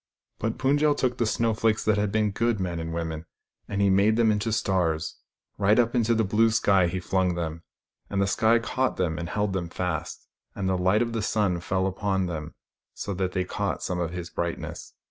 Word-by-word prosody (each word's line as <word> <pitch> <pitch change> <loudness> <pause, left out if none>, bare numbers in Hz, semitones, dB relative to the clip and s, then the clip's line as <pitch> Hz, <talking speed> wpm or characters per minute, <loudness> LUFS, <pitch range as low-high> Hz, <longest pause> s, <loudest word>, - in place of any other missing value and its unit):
But 110 +1 -2
Pund 140 +2 +2
jel 150 -1 +3
took 125 -1 -1
the 115 - +2
snowflakes 110 -1 +1
that 110 -1 +3
had 105 -1 0
been 105 0 +1
good 115 +1 0
men 90 -2 -2
and 80 0 -4
women, 80 -1 -4 0.4
and 100 -1 -1
he 100 - +4
made 100 +3 +4
them 115 -1 +4
into 105 +2 -1
stars. 85 -7 0 0.4
Right 105 +2 +4
up 120 -1 +3
into 115 -2 +2
the 110 - +2
blue 110 +3 +3
sky 100 -5 +3
he 90 +2 -2
flung 90 0 0
them; 85 -1 -4 0.5
and 100 - -1
the 100 - +3
sky 110 +3 +3
caught 130 +3 -1
them 85 -3 -1
and 85 0 -4
held 105 0 -1
them 90 -3 -2
fast, 90 -2 -4 0.3
and 95 -2 -2
the 95 - +2
light 95 +5 +3
of 115 -1 -4
the 115 - -1
sun 100 -4 +1
fell 95 +2 -1
upon 95 0 0
them 80 -4 -5 0.4
so 100 - -4
that 90 0 -2
they 95 - 0
caught - - -3
some 90 -1 -2
of 85 -2 -1
his 85 0 -6
brightness. 85 -1 -5
100 Hz, 215 wpm, -26 LUFS, 90-110 Hz, 0.5 s, he